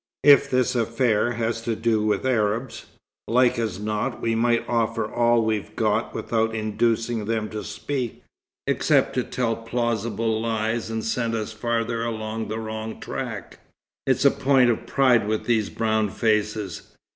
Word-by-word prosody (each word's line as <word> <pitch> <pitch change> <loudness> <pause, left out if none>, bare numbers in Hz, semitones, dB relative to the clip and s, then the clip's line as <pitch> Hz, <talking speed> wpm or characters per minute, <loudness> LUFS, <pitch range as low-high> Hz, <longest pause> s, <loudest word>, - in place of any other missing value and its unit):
If 145 -2 +7
this 130 0 +2
affair 115 0 +1
has 115 0 -2
to 115 0 -2
do 110 -1 +1
with 105 +2 0
Arabs, 115 0 -1 0.4
like 125 +1 +3
as 110 -5 -2
not 105 0 -2
we 115 - 0
might 115 +1 +1
offer 115 -1 0
all 120 +1 +2
we've 110 -2 -2
got - - 0
without 110 -1 0
inducing 115 +1 0
them 110 -1 -1
to 110 -1 -5
speak 120 +3 -4 0.4
except - - +2
to - - 0
tell 120 -3 -1
plausible 115 -1 -1
lies 115 0 -1
and 110 -1 -3
send 115 0 -1
us 110 0 -3
farther 115 0 -1
along 110 -1 -3
the 110 - -3
wrong 110 0 -5
track. - - -6 0.5
It's - - +2
a - - +7
point 130 -3 +3
of 115 - -4
pride 125 -6 +3
with 110 0 -1
these 110 -4 +1
brown 110 -2 0
faces. 105 -3 -1
115 Hz, 155 wpm, -24 LUFS, 110-120 Hz, 0.5 s, If